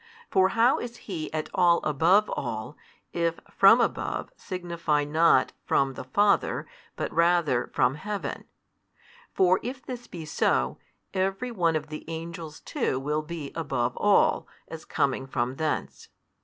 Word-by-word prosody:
For 190 Hz, 0 st, +4 dB
how 235 Hz, +3 st, +4 dB
is 240 Hz, -1 st, -6 dB
He 165 Hz, -6 st, -5 dB
at 155 Hz, 0 st, -3 dB
all 175 Hz, -3 st, +4 dB
above 170 Hz, +8 st, +3 dB
all, -, -, -4 dB, 0.4 s
if 170 Hz, -1 st, 0 dB
from 200 Hz, +5 st, +7 dB
above 240 Hz, -, -1 dB
|186 -, -, -39 dB
signify 170 Hz, -5 st, -1 dB
not 160 Hz, +3 st, +3 dB
From 135 Hz, -1 st, +1 dB
the -, -, -7 dB
Father, 200 Hz, +10 st, +2 dB, 0.3 s
but -, -, -4 dB
rather 170 Hz, -7 st, +2 dB
From 125 Hz, -, +2 dB
Heaven? 200 Hz, +7 st, -5 dB, 0.9 s
For 185 Hz, 0 st, +3 dB
if 255 Hz, +2 st, -6 dB
this 245 Hz, -2 st, -7 dB
be 165 Hz, -3 st, -8 dB
so, 65 Hz, -, 0 dB, 0.3 s
every 195 Hz, +6 st, -1 dB
one 170 Hz, -7 st, +1 dB
of 155 Hz, -, -3 dB
the 155 Hz, -, -7 dB
angels 165 Hz, -1 st, -7 dB
too 130 Hz, -, -1 dB
will 150 Hz, +3 st, -1 dB
be 155 Hz, -2 st, -7 dB
above 130 Hz, -7 st, -1 dB
all, 205 Hz, -1 st, +3 dB, 0.2 s
as 160 Hz, -1 st, -9 dB
coming 135 Hz, -1 st, -1 dB
from 125 Hz, 0 st, -2 dB
thence. 155 Hz, -1 st, -3 dB
165 Hz, 145 wpm, -27 LUFS, 150-190 Hz, 0.9 s, from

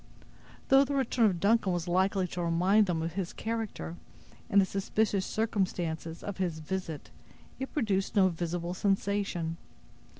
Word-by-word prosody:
Though 270 Hz, 0 st, +7 dB
the 280 Hz, 0 st, -2 dB
return 250 Hz, -3 st, +3 dB
of 180 Hz, -4 st, 0 dB
Duncan 205 Hz, 0 st, +3 dB
was 175 Hz, 0 st, -2 dB
likely 190 Hz, +1 st, +2 dB
to 175 Hz, -, -4 dB
remind 185 Hz, +5 st, +3 dB
them 165 Hz, -3 st, 0 dB
of 165 Hz, 0 st, -3 dB
his 185 Hz, -2 st, -3 dB
character, 220 Hz, -6 st, -4 dB, 0.5 s
and 200 Hz, -, +5 dB
the 195 Hz, -, +5 dB
suspicious 195 Hz, 0 st, 0 dB
circumstances 175 Hz, -6 st, -2 dB
of 200 Hz, -, -5 dB
his 180 Hz, -4 st, -1 dB
visit, 160 Hz, -1 st, -5 dB, 0.5 s
it 265 Hz, -, -4 dB
produced 205 Hz, -9 st, 0 dB
no 195 Hz, -2 st, +6 dB
visible 170 Hz, 0 st, -3 dB
sensation. 195 Hz, -4 st, -1 dB
190 Hz, 145 wpm, -30 LUFS, 170-205 Hz, 0.5 s, Though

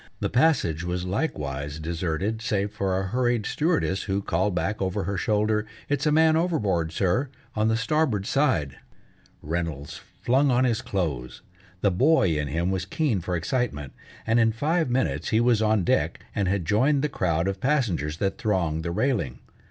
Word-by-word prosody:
The -, -, -2 dB
passage 120 Hz, -, +2 dB
was 90 Hz, +1 st, -2 dB
likewise 75 Hz, -, -3 dB
deserted 85 Hz, +6 st, -2 dB
save 100 Hz, -2 st, -1 dB
for 95 Hz, -2 st, -1 dB
a -, -, -2 dB
hurried 120 Hz, +1 st, 0 dB
stewardess, 155 Hz, -, 0 dB
who 100 Hz, 0 st, -1 dB
called 95 Hz, +3 st, 0 dB
back, 95 Hz, +6 st, -1 dB
over 95 Hz, +1 st, -1 dB
her 100 Hz, +2 st, -2 dB
shoulder, 105 Hz, +3 st, +1 dB, 0.2 s
"It's 145 Hz, +1 st, 0 dB
a -, -, +3 dB
man 160 Hz, +1 st, +5 dB
overboard, 105 Hz, -, 0 dB
sir, 95 Hz, -, 0 dB, 0.3 s
on 110 Hz, 0 st, +2 dB
the 110 Hz, 0 st, +2 dB
starboard 115 Hz, -4 st, 0 dB
side 115 Hz, -, +1 dB, 0.3 s
" -, -, -33 dB
Reynolds 80 Hz, -3 st, -4 dB, 0.2 s
flung 135 Hz, +4 st, +3 dB
on 125 Hz, 0 st, +3 dB
his 120 Hz, -2 st, +1 dB
clothes. 75 Hz, -, -3 dB, 0.4 s
The 100 Hz, -, +3 dB
boy 130 Hz, -, +3 dB
in 75 Hz, -1 st, -1 dB
him 85 Hz, +6 st, -1 dB
was 95 Hz, -1 st, -1 dB
keen 115 Hz, -, 0 dB
for 90 Hz, +1 st, -2 dB
excitement, 85 Hz, -, -2 dB, 0.3 s
and 115 Hz, +1 st, +3 dB
in 115 Hz, -1 st, +3 dB
five 155 Hz, +5 st, 0 dB
minutes 130 Hz, +1 st, 0 dB
he 110 Hz, -, +3 dB
was 120 Hz, -2 st, +3 dB
on 110 Hz, -3 st, +2 dB
deck, -, -, +1 dB
and 100 Hz, -2 st, 0 dB
had 95 Hz, -2 st, 0 dB
joined 135 Hz, -, +2 dB
the -, -, +3 dB
crowd 85 Hz, -, 0 dB
of 95 Hz, 0 st, -3 dB
passengers 100 Hz, -, 0 dB
that 95 Hz, +4 st, -1 dB
thronged 90 Hz, -9 st, 0 dB
the 85 Hz, -, -2 dB
railing. 90 Hz, -, 0 dB
100 Hz, 175 wpm, -25 LUFS, 85-125 Hz, 0.4 s, man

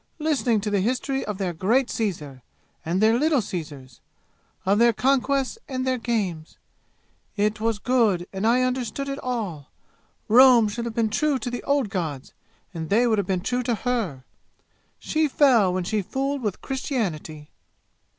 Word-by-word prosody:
listening 285 Hz, -8 st, +1 dB
to 210 Hz, +1 st, -3 dB
the 200 Hz, -, +2 dB
history 255 Hz, +6 st, -1 dB
of 210 Hz, -2 st, -4 dB
their 190 Hz, -3 st, -2 dB
great 230 Hz, +10 st, +1 dB
Caesar, 150 Hz, -, -3 dB, 0.4 s
and 170 Hz, +3 st, -1 dB
their 225 Hz, +2 st, +4 dB
little 305 Hz, -1 st, +3 dB
Caesars 150 Hz, -, -7 dB, 0.6 s
of 200 Hz, +3 st, +3 dB
their 235 Hz, 0 st, +5 dB
conquests 275 Hz, -, +1 dB
and 255 Hz, -1 st, -2 dB
their 255 Hz, -1 st, 0 dB
games! 195 Hz, -10 st, -3 dB, 0.8 s
It 210 Hz, +1 st, 0 dB
was 225 Hz, -1 st, 0 dB
good, 215 Hz, -7 st, +1 dB
and 195 Hz, +3 st, -1 dB
I 250 Hz, +2 st, +3 dB
understood 255 Hz, +1 st, -2 dB
it 275 Hz, 0 st, -4 dB
all! 200 Hz, -, -4 dB, 0.6 s
Rome 240 Hz, -1 st, +7 dB
should 235 Hz, +3 st, -4 dB
have 230 Hz, -1 st, -5 dB
been 225 Hz, -2 st, +1 dB
true 300 Hz, +4 st, +1 dB
to 250 Hz, -1 st, -5 dB
the 245 Hz, -, -4 dB
old 280 Hz, -6 st, +1 dB
gods, 155 Hz, -8 st, -4 dB, 0.4 s
and 160 Hz, -2 st, -5 dB
they 230 Hz, +5 st, +3 dB
would 220 Hz, -3 st, +2 dB
have 195 Hz, -, -2 dB
been 185 Hz, -2 st, 0 dB
true 245 Hz, +6 st, -1 dB
to 240 Hz, -1 st, -1 dB
her! 215 Hz, -, -2 dB, 0.7 s
She 315 Hz, 0 st, 0 dB
fell 255 Hz, -9 st, +4 dB
when 185 Hz, 0 st, -1 dB
she 210 Hz, +4 st, -1 dB
fooled 270 Hz, +7 st, -2 dB
with 210 Hz, -5 st, -3 dB
Christianity!" 180 Hz, -, -4 dB
225 Hz, 165 wpm, -24 LUFS, 190-255 Hz, 0.8 s, Rome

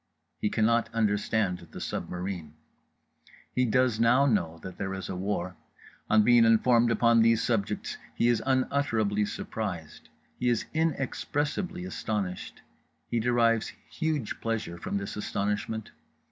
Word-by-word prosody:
He 105 Hz, -, 0 dB
cannot 115 Hz, +2 st, +2 dB
understand 105 Hz, -3 st, +1 dB
the -, -, -9 dB
submarine. 90 Hz, -4 st, -4 dB, 1.0 s
He 125 Hz, -, +2 dB
does 125 Hz, -1 st, +2 dB
now 120 Hz, +4 st, +5 dB
know 85 Hz, -11 st, +1 dB
that 95 Hz, -1 st, -8 dB
there 95 Hz, -1 st, -2 dB
is 95 Hz, -, -6 dB
a 95 Hz, -, -3 dB
war. 90 Hz, -1 st, -2 dB, 0.5 s
On 110 Hz, 0 st, +5 dB
being 120 Hz, +1 st, +6 dB
informed 115 Hz, +1 st, +4 dB
upon 115 Hz, 0 st, +4 dB
these 115 Hz, 0 st, +4 dB
subjects 110 Hz, -4 st, -1 dB, 0.2 s
he 120 Hz, -, +2 dB
is 120 Hz, -2 st, +3 dB
unutterably 125 Hz, -6 st, +1 dB
surprised, 90 Hz, -7 st, -5 dB, 0.3 s
he 125 Hz, -, +2 dB
is 120 Hz, -2 st, +1 dB
inexpressibly 160 Hz, +3 st, -1 dB
astonished. 105 Hz, -, -4 dB, 0.5 s
He 120 Hz, -, +1 dB
derives 115 Hz, -1 st, +2 dB, 0.2 s
huge 155 Hz, -8 st, -2 dB
pleasure 110 Hz, -7 st, -3 dB
from 100 Hz, -, -2 dB
this 100 Hz, 0 st, -5 dB
astonishment. 105 Hz, +1 st, -2 dB
110 Hz, 130 wpm, -28 LUFS, 100-120 Hz, 1.0 s, being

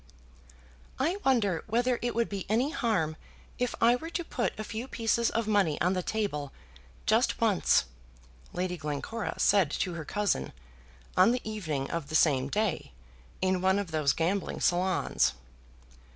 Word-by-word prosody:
"I 330 Hz, +8 st, 0 dB
wonder 205 Hz, -11 st, +2 dB
whether 240 Hz, +2 st, +1 dB
it 240 Hz, 0 st, -2 dB
would 235 Hz, 0 st, +1 dB
be 195 Hz, -2 st, -5 dB
any 245 Hz, +7 st, +2 dB
harm 175 Hz, -, 0 dB, 0.4 s
if 250 Hz, -1 st, -1 dB
I 235 Hz, +1 st, +5 dB
were 325 Hz, +6 st, -6 dB
to 345 Hz, +1 st, -3 dB
put 240 Hz, -8 st, -2 dB
a -, -, -2 dB
few 225 Hz, +3 st, -5 dB
pieces 230 Hz, -1 st, +1 dB
of 230 Hz, -1 st, -1 dB
money 200 Hz, -8 st, +2 dB
on 180 Hz, +2 st, +2 dB
the 185 Hz, -, -1 dB
table, 175 Hz, -9 st, -2 dB, 0.5 s
just -, -, +2 dB
once?" -, -, +3 dB, 0.7 s
Lady 180 Hz, 0 st, -2 dB
Glencora 155 Hz, +9 st, -4 dB
said 195 Hz, -7 st, +4 dB
to 180 Hz, +4 st, -2 dB
her 165 Hz, -2 st, -5 dB
cousin, 200 Hz, -, -1 dB, 0.6 s
on 190 Hz, +6 st, +5 dB
the 250 Hz, -, -1 dB
evening 160 Hz, -11 st, -3 dB
of 165 Hz, -4 st, -3 dB
the 155 Hz, -, -3 dB
same 140 Hz, -5 st, +3 dB
day, 205 Hz, -2 st, -1 dB, 0.5 s
in 185 Hz, -1 st, +2 dB
one 190 Hz, +1 st, +3 dB
of 200 Hz, -4 st, -3 dB
those 155 Hz, -3 st, +2 dB
gambling 180 Hz, +4 st, -1 dB
salons. 180 Hz, -, +1 dB
200 Hz, 155 wpm, -29 LUFS, 165-230 Hz, 0.7 s, I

